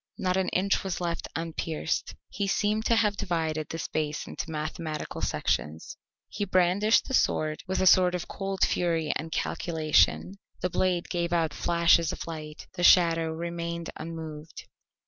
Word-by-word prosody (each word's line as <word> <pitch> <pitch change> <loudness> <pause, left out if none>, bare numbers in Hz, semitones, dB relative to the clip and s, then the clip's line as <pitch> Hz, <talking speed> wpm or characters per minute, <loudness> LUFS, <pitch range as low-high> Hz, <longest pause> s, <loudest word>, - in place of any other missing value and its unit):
Not 185 -1 0
an 190 -1 +1
inch 195 +2 +1
was 190 -3 -3
left 170 -1 -3
unpierced. 165 -1 -3
He 200 -1 -2
seemed 210 +2 0
to 230 - +4
have 210 -2 +2
divided 160 -4 -2
the 165 - -4
space 155 -2 -2
into 160 - -6
mathematical 155 0 -4
sections. 80 +2 -2 0.3
He 205 - -4
brandished 190 +3 +3
the 265 - -5
sword 155 -10 +1
with 190 +1 -1
a - - +2
sort 180 -1 +6
of 180 - -4
cold 195 -1 -1
fury 165 -3 0
and 160 +1 -4
calculation; 165 +5 +1 0.2
the 180 - -2
blade 180 -1 0
gave 170 -1 -1
out 165 -2 +1
flashes 170 -1 +3
of - - -6
light, 155 -2 -7
the 175 -2 -4
shadow 165 -2 +5
remained 170 0 -4
unmoved. 160 -2 -8
170 Hz, 155 wpm, -28 LUFS, 160-185 Hz, 0.3 s, sort